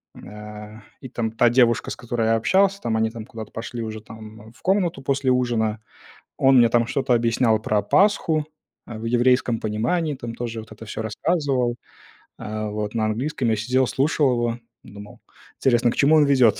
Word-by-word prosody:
а, 105 +1 -10 0.2
и 130 - -8
там 115 -3 -3
та 120 +1 +3
девушка, 120 -1 +2
с - - -4
которой 120 -2 -2
я 115 - +3
общался, 195 - +2
там, 110 -1 -1
они, 110 0 +1
там, 115 -2 -8
куда-то 110 -3 -9
пошли 115 +1 -6
уже, 110 -1 -6
там, 110 0 -12
в - - -23
комнату 180 -7 0
после 135 -1 0
ужина. 115 -4 0 0.6
Он 135 -1 +5
мне, 120 -1 +6
там, 120 -1 +2
что-то 135 -1 -1
объяснял 115 -1 +2
про 105 -2 0
Пасху, 160 - +2 0.4
а, 110 -2 -8
в 115 - -8
еврейском 120 0 +2
понимании, 130 +9 -1
там, 120 -3 -7
тоже 115 -2 -5
вот 110 - -13
это 110 +1 -11
всё 110 - -5
рассказывал. 130 - -1 0.6
А, 110 0 -4
вот, 105 0 -4
на 110 -2 0
английском 120 +3 -1
я 110 - +2
сидел 125 +4 +1
слушал 145 0 +1
его, 120 -1 -1 0.2
думал, 105 0 -12 0.4
интересно, 120 -2 +2
к - - -6
чему 150 +3 +4
он 150 - +5
ведёт? 130 -7 +4
120 Hz, 185 wpm, -23 LUFS, 110-130 Hz, 0.6 s, мне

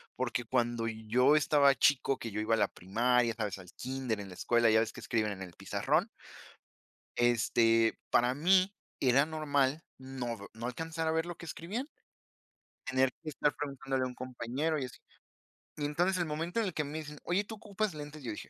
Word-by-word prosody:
porque 125 -1 -2
cuando 120 -1 0
yo 115 +6 +3
estaba 145 -2 +5
chico, 135 +2 +3
que 115 - -6
yo 105 - -2
iba 110 +1 +2
a - - -1
la - - +3
primaria, 115 +5 +1
¿sabes?, 105 -3 -3
al 90 -2 -12
kínder, 130 -4 -3
en 100 -1 -7
la - - -9
escuela, 120 +5 +3
¿ya 110 - +5
ves 110 0 0
que - - -10
escriben 110 -2 0
en 95 -1 -6
el 90 - -10
pizarrón? - - 0 1.1
Este, 115 -1 +3
para 120 +1 +3
mí 185 +7 +4 0.3
era 135 +2 +4
normal 150 -2 0 0.2
no 130 -3 -5
v 100 0 -10
no 110 +2 -6
alcanzar 160 +5 -3
a - - +2
ver 160 +1 +1
lo 175 0 -6
que - - -9
escribían, 200 - -4 1.0
tener 130 0 +3
que 160 - -8
estar 145 0 +1
preguntándole 135 -2 -2
a - - -1
un 125 - -6
compañero 130 +5 -2
y 135 - -2
así. 125 - -9 0.8
Y 145 - -2
entonces, 175 +6 +1
el 175 - 0
momento 165 +6 -2
en 225 - +1
el 185 - -3
que 150 - -1
me 145 +2 -5
dicen: 150 -1 -8
Oye, 185 +4 0
tú 220 - -7
ocupas 210 -2 -3
lentes", 150 0 -8
yo 120 -4 -4
dije: 105 - -8
130 Hz, 200 wpm, -32 LUFS, 115-155 Hz, 1.1 s, estaba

